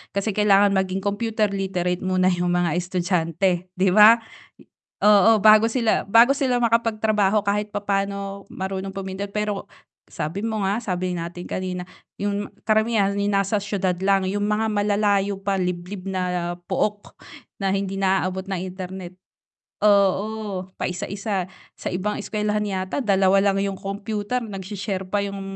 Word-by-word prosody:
kasi 200 +2 0
kailangan 200 0 +4
maging 190 0 0
computer 215 0 0
literate 185 -2 -1
muna 185 0 +2
yung 175 0 0
mga 175 -3 +1
estudyante, 180 0 0
'di 185 +1 +2
ba? 215 +3 +8 0.8
Oo, 210 +1 +6
bago 215 +1 +7
sila, 230 -2 +1
bago 230 +6 +6
sila 265 -3 0
makapagtrabaho 215 -3 +2
kahit 205 +1 0
papaano 200 -1 -2
marunong 190 0 -4
pumindot, 195 +1 -4
pero 210 -1 -2 0.4
sabi 165 +6 -4
mo 220 -2 -2
nga, 200 +3 +1
sabi 180 -3 -2
natin 170 +1 -6
kanina, 185 -1 -3 0.4
yung 205 0 -2
karamihan 220 -2 +2
yung 200 0 0
nasa 195 +1 +1
siyudad 195 -3 -1
lang, 195 -1 +3
yung 205 +1 -1
mga 215 +1 0
malalayo 205 -1 +1
pa 195 -1 0
liblib 180 +2 -4
na 180 -2 -2 0.2
pook 205 +2 -2 0.5
na 195 0 +1
hindi 195 0 -2
naaabot 190 -1 0
ng 190 -2 -2
internet 185 -1 -7 0.7
oo, 200 -1 +1
paisa-isa 190 +1 -3 0.3
sa - - -7
ibang 195 +4 -2
eskuwelahan 210 0 -1
yata 190 -2 -3
dalawa 195 -2 +3
lang 195 -1 +2
yung 195 - -3
computer 205 +4 -3
nag-she-share 200 -2 -5
pa 205 - 0
yung 200 0 -5
195 Hz, 140 wpm, -23 LUFS, 185-210 Hz, 0.8 s, ba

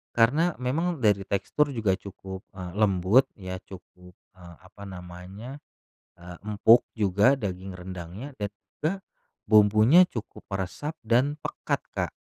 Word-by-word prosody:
Karena 150 +9 +3
memang 160 +7 -1
dari 100 -2 +3
tekstur 140 +9 0
juga 105 -5 +1
cukup, 95 -1 -9
eee, 90 -2 -6
lembut 105 +4 +4 0.2
ya, 95 -1 -5
cukup, 90 -1 -14 0.2
eee, 85 -2 -13
apa 100 +2 -14
namanya, 95 +8 -9 0.6
eee, 90 0 -10
empuk 110 +3 +5
juga 105 +6 +3
daging 95 -2 -4
rendangnya 90 +8 -8
dan 105 - -1 0.3
juga 155 +3 +1 0.6
bumbunya 110 - +6
cukup 115 - -8
meresap 95 - -3
dan 130 +7 +1
pekat, - - -3 0.2
Kak. - - -1
100 Hz, 125 wpm, -26 LUFS, 95-125 Hz, 0.6 s, bumbunya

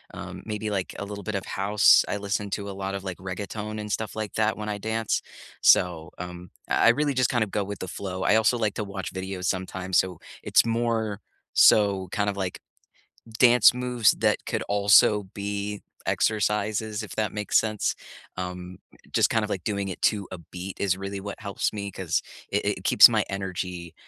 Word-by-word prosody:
um, - - -8
maybe, 105 0 -3
like, 95 -2 -3
a 100 - -4
little 100 0 -7
bit 105 - -4
of 95 - -3
house. 100 +2 +4
I 105 - -2
listen 100 0 -2
to 100 -1 -3
a - - -4
lot 95 0 -4
of, 100 - -5
like, 95 -2 -5
reggaeton 105 +3 -5
and 105 0 -5
stuff 110 -1 -3
like 110 -2 -4
that 110 0 +1
when 105 0 -5
I 105 -1 -3
dance. 110 +1 -1 0.4
So, 85 -3 +4
um, 90 0 -8 0.2
I - - +4
really 145 +4 +2
just 130 -1 +2
kind 120 -3 +2
of 105 - -6
go 105 - 0
with 100 +1 -6
the 95 - -5
flow. 95 -1 -5
I - - +4
also 110 +2 +3
like 110 -3 0
to 105 - -2
watch 100 -3 -6
videos 95 -1 -5
sometimes, 95 0 0
so 90 -3 -1 0.3
it's - - +4
more 115 -3 -1 0.3
so 100 -3 +5
kind 105 -2 0
of, 100 - -3
like, 95 -2 -3 0.8
dance 125 -2 +7
moves 125 -3 +2
that - - +1
could - - -2
also 105 0 +5
be 100 0 -4 0.2
exercises 105 0 0
if - - -8
that 110 -1 -1
makes 105 -1 +1
sense. 110 -2 0 0.4
Um, 90 0 -6 0.4
just - - +3
kind 110 - +1
of, 105 - -3
like, 95 -4 -3
doing 100 -2 -2
it 95 - -6
to 100 -3 +2
a 95 - -5
beat 90 +3 -8
is 95 -2 +1
really 100 +1 -5
what 100 0 -7
helps 100 -2 -2
me, 100 -2 -5
'cause 90 -4 -1 0.3
i - - +3
it - - -2
keeps - - +9
my - - +1
energy, 90 -3 -5
100 Hz, 200 wpm, -26 LUFS, 95-110 Hz, 0.8 s, keeps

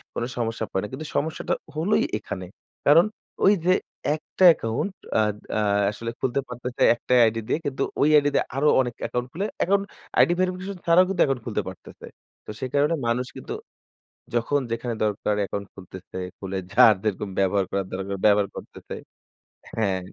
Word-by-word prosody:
কোনো 120 - -1
সমস্যা 115 -1 -2
পড়ে 95 - 0
না। 105 - -3
কিন্তু 150 +4 -5
সমস্যাটা 155 +2 -1 0.2
হলোই 170 +7 +2 0.2
এখানে। 95 -3 -6 0.4
কারণ 160 +4 +7 0.4
ওই 200 - +7
যে 185 - +5 0.4
একটা 155 +4 -3
অ্যাকাউন্ট 140 - +1 0.3
আদ 105 -1 0 0.2
আ - - +2 0.3
আসলে 115 +2 -5
খুলতে 130 +1 0
পারতেছে। 125 0 -6
একটাই 125 +1 +2
আইডি 115 0 0
দিয়ে - - 0
কিন্তু 135 -1 -1 0.2
ওই 150 - +5
আইডি 145 0 +3
দিয়ে - - +2
আরো 150 +2 +3
অনেক 120 -2 -3
অ্যাকাউন্ট 125 0 -2
খুলে, 195 +5 -2
অ্যাকাউন্ট 200 +1 +2 0.3
আইডি 175 - +6
ভেরিফিকেশন 185 +1 -2
ছাড়াও 170 +2 +6
কিন্তু 185 -3 0
অ্যাকউন্ট 135 -3 0
খুলতে - - -1
পারতেছে। - - -12 0.4
তো - - -6
সে - - -3
কারণে 145 +3 +3
মানুষ 125 +2 0
কিন্তু - - -6 0.8
যখন 140 +5 +1
যেখানে 115 +1 -2
দরকার 105 0 0
অ্যাকাউন্ট 100 0 -3
খুলতেছে। 95 -1 -11 0.2
খুলে 95 0 -5 0.2
যার 110 - +7
যেরকম 105 -1 -1
ব্যবহার 95 0 +2
করার 100 -1 -1
দরকার 95 +1 -3
ব্যবহার 100 -1 +4
করতেছে। - - -9 0.8
হ্যাঁ। 100 -4 +1
120 Hz, 165 wpm, -24 LUFS, 105-155 Hz, 0.8 s, কারণ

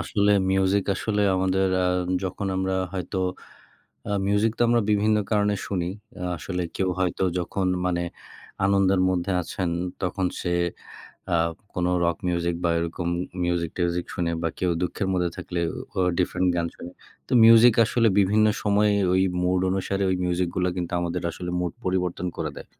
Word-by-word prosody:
আসলে 105 -1 +1 0.2
মিউজিক 95 +1 +2
আসলে 105 +1 -1
আমাদের 95 +1 +1 0.2
আ - - +2 0.4
যখন 95 +2 -3
আমরা 95 0 0 0.2
হয়তো 95 +1 -3 0.9
আ - - -1 0.2
মিউজিক 105 +2 +2
তো - - -1
আমরা 120 0 +3
বিভিন্ন 105 +1 +3
কারণে 105 -1 +2
শুনি। 90 -4 -1 0.5
আসলে 90 +2 -4
কেউ 95 -1 0
হয়তো 95 0 0 0.2
যখন 95 +2 -2 0.2
মানে 90 -1 0 0.6
আনন্দের 95 -1 +3
মধ্যে 90 +1 -1
আছেন 90 +1 -3 0.3
তখন 95 +1 -1 0.2
সে 90 - -2 0.8
আ - - +4 0.4
কোনো 90 0 0 0.2
রক 85 -1 0
মিউজিক 85 -1 0
বা 85 - +2
এরকম 85 +1 -3 0.4
মিউজিক-টিউজিক 85 0 -1
শুনে 85 -2 -1
বা 85 - 0
কেউ 90 -1 +1
দুঃখের 90 +2 -2
মধ্যে 90 -1 +1
থাকলে 90 - -4 0.4
ও - - +1 0.2
ডিফারেন্ট 90 0 +1
গান 85 -1 0
শোনে। 85 - -9 0.4
তো - - -13
মিউজিক 115 +1 +8
আসলে 115 +1 +2
বিভিন্ন 105 +2 +4 0.2
সময়ে 105 0 +3 0.2
ওই 95 - +3 0.2
মুড 90 +1 +2
অনুসারে 95 +1 -1
ওই 95 - +2
মিউজিকগুলা 90 0 0
কিন্তু 90 -2 -3
আমাদের 85 0 -2
আসলে 90 +2 -6
মুড 90 -1 -1
পরিবর্তন 90 -1 -1
করে - - -2
দেয় - - -9
95 Hz, 155 wpm, -25 LUFS, 90-100 Hz, 0.9 s, মিউজিক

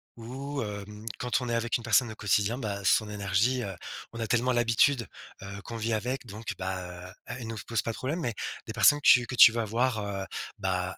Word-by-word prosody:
où, 135 +4 -5
hem, 105 +1 -7
quand 125 +1 0
on 125 - -3
est - - 0
avec 115 0 0
une 120 - -11
personne 120 +1 +3
au 110 - -8
quotidien, 105 +3 +1
ben, 100 -5 -4
son 110 +3 +3
énergie, 105 +5 +1
heu, 100 -5 -5 0.4
on 115 - -7
a 115 - -1
tellement 120 +3 +2
l'habitude, 120 +2 +3 0.4
heu, 100 +1 -7
qu'on 115 +2 -7
vit 115 +1 -1
avec, 125 +5 -2
donc, 110 0 -6
bah 90 -1 -5
heu, - - -15
elle 125 -2 -6
nous 115 0 -5
se - - -8
pose 115 - -1
pas 115 - -2
de - - -8
problème. 150 +7 -2
Mais 120 -7 -1 0.3
des - - -6
personnes 145 - +5
que 145 - -1
tu 120 -1 +7
que 125 - -4
tu 115 - +10
vas 115 -1 -1
voir, 115 +1 0
heu, 100 -1 -4 0.3
bah, 90 -1 -2
115 Hz, 235 wpm, -28 LUFS, 100-120 Hz, 0.4 s, tu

